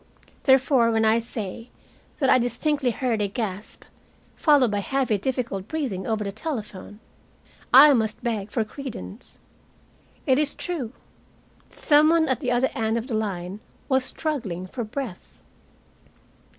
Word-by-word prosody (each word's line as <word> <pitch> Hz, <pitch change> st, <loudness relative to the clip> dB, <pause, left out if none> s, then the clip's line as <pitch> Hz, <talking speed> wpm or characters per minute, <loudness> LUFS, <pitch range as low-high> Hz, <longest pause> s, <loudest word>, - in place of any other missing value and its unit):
Therefore 265 Hz, -3 st, +4 dB
when 225 Hz, -1 st, +2 dB
I 220 Hz, +1 st, +4 dB
say 230 Hz, 0 st, -6 dB, 0.5 s
that 270 Hz, -, +1 dB
I 255 Hz, -, +5 dB
distinctly 255 Hz, +3 st, 0 dB
heard 240 Hz, -2 st, -1 dB
a 205 Hz, -, +1 dB
gasp, 205 Hz, -1 st, -4 dB, 0.5 s
followed 285 Hz, -7 st, +4 dB
by 205 Hz, -, 0 dB
heavy 250 Hz, -1 st, 0 dB
difficult 235 Hz, -5 st, -3 dB
breathing, 255 Hz, -12 st, -3 dB
over 220 Hz, -1 st, 0 dB
the 200 Hz, -, -3 dB
telephone, 210 Hz, -, -6 dB, 0.7 s
I 285 Hz, +3 st, +9 dB
must 220 Hz, -3 st, -1 dB
beg 220 Hz, -4 st, -2 dB
for 225 Hz, +2 st, 0 dB
credence. 215 Hz, -, -8 dB, 0.9 s
It 260 Hz, +1 st, +3 dB
is 300 Hz, -1 st, 0 dB
true. 310 Hz, -11 st, -4 dB, 0.8 s
Some 300 Hz, 0 st, +4 dB
one 325 Hz, -1 st, +3 dB
at 260 Hz, -, +1 dB
the 260 Hz, -4 st, -2 dB
other 245 Hz, +2 st, +2 dB
end 225 Hz, 0 st, 0 dB
of 230 Hz, -, -3 dB
the 255 Hz, -, -6 dB
line 195 Hz, -3 st, -3 dB, 0.3 s
was 265 Hz, -1 st, +3 dB
struggling 235 Hz, -, -3 dB
for 240 Hz, +6 st, -5 dB
breath. 220 Hz, -3 st, -7 dB
235 Hz, 140 wpm, -24 LUFS, 210-270 Hz, 0.9 s, I